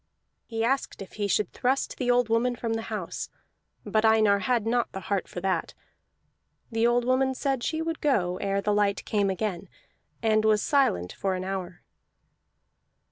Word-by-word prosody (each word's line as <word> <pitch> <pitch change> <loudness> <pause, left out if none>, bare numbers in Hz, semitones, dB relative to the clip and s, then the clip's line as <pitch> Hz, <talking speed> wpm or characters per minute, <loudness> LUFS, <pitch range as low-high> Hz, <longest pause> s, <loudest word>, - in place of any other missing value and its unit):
He 225 -1 -2
asked 270 +4 0
if 190 - -15
he 205 -1 -2
should 200 0 0
thrust 260 +2 0
the 250 -2 0
woman 245 0 +2
from 230 -1 -2
the 225 - -1
house, - - -4 0.6
but 215 0 +1
Einar 215 -2 +5
had 230 +2 0
not 235 +1 +1
the 190 - -4
heart 195 -1 -2
for 175 - -7
that. 185 -3 -1 1.0
The 225 +1 +2
old 240 0 +2
woman 260 +1 +2
said 270 -2 -1
she 315 +5 -1
would 330 -1 -3
go 185 -11 +1
ere 195 0 -1
the 210 +1 +1
light 205 -1 +1
came 205 -2 +1
again, 190 -1 -3 0.5
and 215 -1 +3
was 215 -1 +3
silent 180 - +2
for 190 -1 -1
an 185 - -4
hour. 185 -2 -5
220 Hz, 170 wpm, -27 LUFS, 195-245 Hz, 1.0 s, Einar